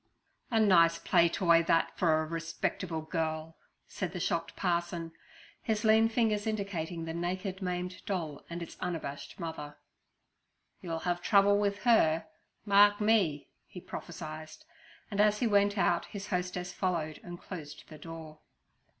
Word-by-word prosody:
'A 225 Hz, -, +2 dB
nice 170 Hz, -5 st, +5 dB
play 170 Hz, -1 st, +3 dB
toy 170 Hz, -1 st, +4 dB
that 165 Hz, 0 st, +1 dB
for 160 Hz, -3 st, +2 dB
a -, -, -4 dB
respectable 165 Hz, +1 st, -3 dB
girl' 160 Hz, -1 st, -3 dB, 0.3 s
said 185 Hz, -3 st, -4 dB
the 180 Hz, -, -4 dB
shocked 170 Hz, 0 st, -1 dB
parson, 170 Hz, -2 st, -1 dB, 0.5 s
his 220 Hz, -1 st, -1 dB
lean 220 Hz, 0 st, +5 dB
fingers 220 Hz, -2 st, +1 dB
indicating 180 Hz, -6 st, -3 dB
the 160 Hz, -, -4 dB
naked, 185 Hz, +3 st, -3 dB
maimed 180 Hz, 0 st, -3 dB
doll 165 Hz, -7 st, -3 dB
and 170 Hz, 0 st, -5 dB
its -, -, -10 dB
unabashed 160 Hz, -4 st, -5 dB
mother. 150 Hz, -3 st, -6 dB, 1.0 s
'You'll 165 Hz, -2 st, -4 dB
have 175 Hz, 0 st, 0 dB
trouble 200 Hz, +1 st, +5 dB
with 205 Hz, 0 st, -1 dB
her, 165 Hz, -10 st, +4 dB, 0.4 s
mark 205 Hz, 0 st, +6 dB
me' 195 Hz, -10 st, +2 dB, 0.2 s
he 180 Hz, -, -9 dB
prophesied; 155 Hz, -3 st, -7 dB, 0.6 s
and 205 Hz, 0 st, +2 dB
as 210 Hz, 0 st, +4 dB
he 240 Hz, -, 0 dB
went 205 Hz, -1 st, +3 dB
out 175 Hz, -3 st, +2 dB
his 200 Hz, -1 st, -7 dB
hostess 180 Hz, -1 st, -2 dB
followed 165 Hz, -5 st, -2 dB
and 175 Hz, -1 st, -8 dB
closed 150 Hz, -4 st, -8 dB
the 155 Hz, -, -12 dB
door. 160 Hz, -2 st, -9 dB
175 Hz, 145 wpm, -31 LUFS, 165-200 Hz, 1.0 s, mark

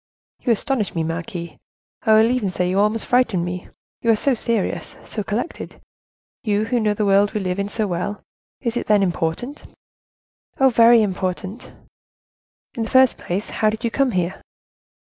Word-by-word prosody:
"You 245 Hz, -, 0 dB
astonish 230 Hz, -3 st, -1 dB
me, 165 Hz, -, 0 dB
marquise; 170 Hz, +1 st, -5 dB, 0.4 s
I 220 Hz, -, +3 dB
will 220 Hz, +2 st, +5 dB
even 245 Hz, -6 st, 0 dB
say 180 Hz, 0 st, -1 dB
you 185 Hz, +2 st, +1 dB
almost 210 Hz, +2 st, +1 dB
frighten 225 Hz, -8 st, +2 dB
me. 180 Hz, 0 st, -5 dB, 0.3 s
You, 230 Hz, -1 st, +4 dB
so 270 Hz, +5 st, +2 dB
serious, 215 Hz, -7 st, -2 dB
so 215 Hz, -, -4 dB
collected; 225 Hz, +11 st, -4 dB, 0.6 s
you 210 Hz, -1 st, +1 dB
who 240 Hz, +2 st, 0 dB
know 210 Hz, -2 st, +1 dB
the 210 Hz, -, 0 dB
world 200 Hz, +1 st, +3 dB
we 215 Hz, -, 0 dB
live 185 Hz, -1 st, -2 dB
in 200 Hz, 0 st, -2 dB
so 215 Hz, +1 st, -1 dB
well. 195 Hz, +2 st, -3 dB, 0.4 s
Is 235 Hz, -2 st, -2 dB
it, -, -, -2 dB
then, 210 Hz, -2 st, +4 dB
important?" 180 Hz, -, -2 dB, 1.0 s
"Oh! 265 Hz, 0 st, +6 dB
very 230 Hz, -1 st, +6 dB
important." 190 Hz, +2 st, -4 dB, 1.0 s
"In 230 Hz, -, -4 dB
the 225 Hz, -, -2 dB
first 260 Hz, -1 st, +5 dB
place, 190 Hz, +4 st, -3 dB
how 215 Hz, -, +2 dB
did 220 Hz, +3 st, -5 dB
you 235 Hz, -, 0 dB
come 275 Hz, +1 st, +2 dB
here?" 185 Hz, -4 st, -2 dB
210 Hz, 170 wpm, -21 LUFS, 185-235 Hz, 1.0 s, Oh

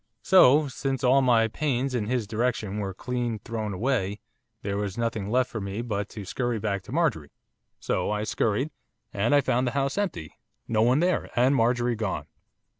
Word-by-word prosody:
So, 150 Hz, -5 st, +6 dB
since 135 Hz, -1 st, -3 dB
all 130 Hz, +2 st, +5 dB
my 120 Hz, -3 st, +4 dB
pains 135 Hz, +1 st, -1 dB
in 110 Hz, -4 st, -1 dB
his 125 Hz, -2 st, 0 dB
direction 110 Hz, -2 st, -1 dB
were 100 Hz, -2 st, -2 dB
clean 120 Hz, +3 st, -3 dB
thrown 110 Hz, 0 st, -4 dB
away, 105 Hz, -1 st, -1 dB, 0.4 s
there 100 Hz, 0 st, -2 dB
was 100 Hz, 0 st, -3 dB
nothing 110 Hz, -4 st, -2 dB
left 125 Hz, +2 st, +1 dB
for 110 Hz, -, -4 dB
me 100 Hz, +4 st, -4 dB
but 105 Hz, -4 st, -3 dB
to 105 Hz, -3 st, -8 dB
scurry 120 Hz, +4 st, -2 dB
back 100 Hz, -2 st, -2 dB
to -, -, -10 dB
Marjorie, 135 Hz, -, 0 dB, 0.5 s
so -, -, -1 dB
I 105 Hz, 0 st, -1 dB
scurried, 115 Hz, +6 st, 0 dB, 0.4 s
and 110 Hz, +8 st, +2 dB
I 145 Hz, -, +5 dB
found 125 Hz, -1 st, +1 dB
the 120 Hz, -, -2 dB
house 140 Hz, +7 st, 0 dB
empty, 130 Hz, -, -3 dB, 0.3 s
no 110 Hz, -2 st, +1 dB
one 125 Hz, +6 st, +4 dB
there, 180 Hz, +1 st, +1 dB
and 130 Hz, +3 st, +4 dB
Marjorie 120 Hz, 0 st, +2 dB
gone. 105 Hz, -3 st, -2 dB
120 Hz, 185 wpm, -26 LUFS, 105-130 Hz, 0.5 s, So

